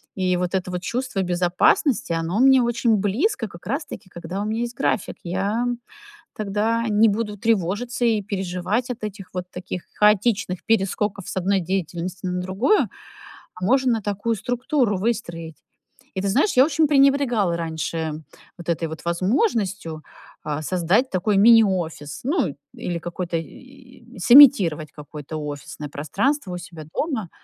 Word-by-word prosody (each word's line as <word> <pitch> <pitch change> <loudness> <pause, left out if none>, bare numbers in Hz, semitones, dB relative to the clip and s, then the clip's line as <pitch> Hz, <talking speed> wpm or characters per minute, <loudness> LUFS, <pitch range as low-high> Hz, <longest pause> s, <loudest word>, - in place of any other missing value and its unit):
И 185 -2 +1
вот 180 0 -2
это 185 -1 -1
вот 180 0 -4
чувство 235 -5 -2
безопасности, 180 - +2
оно 165 +5 -1
мне 265 0 +6
очень 235 -2 +2
близко 225 - 0
как 175 -2 -14
раз-таки, 245 - -5
когда 175 +3 -5
у - - -2
меня 220 +2 -2
есть 240 0 -4
график. 200 - -1
Я, 195 +6 -1
м, 245 -1 -2 0.6
тогда 220 +2 0
не 215 +2 +5
буду 210 0 -2
тревожиться 225 +3 0
и 220 -3 +2
переживать 190 +4 -2
от 245 -3 -6
этих 200 -2 -6
вот 180 - -3
таких 180 0 -6 0.2
хаотичных 210 -3 +2
перескоков 200 -2 0
с - - -5
1 195 +2 +2
деятельности 180 +1 -3
на 180 0 -2
другую. 195 - +1 0.7
А 180 - -4
можно 250 -1 +2
такую 205 +3 -1
структуру 245 -1 0
выстроить. 170 -8 -3 0.6
И 190 - -1
ты 195 - -1
знаешь, 285 - +2
я 255 - +7
очень 310 0 +2
пренебрегала 270 - +3
раньше 160 -1 -3 0.3
вот 175 -1 -8
этой 165 -1 0
вот 160 +1 -8
возможностью, 190 - 0 0.4
а, 150 0 -3
создать 185 - +1
такой 195 +2 0
мини-офис, 190 -9 +3
ну 270 - 0 0.2
или 170 -1 -4
какой-то, 175 0 -3
и 255 - -11 0.2
и - - -10
сымитировать 190 - +7
какое-то 150 0 -8
офисное 145 0 -6
пространство 190 - -1
у - - -3
себя 170 -3 -10
дома. 255 - -2
195 Hz, 150 wpm, -23 LUFS, 175-235 Hz, 0.7 s, я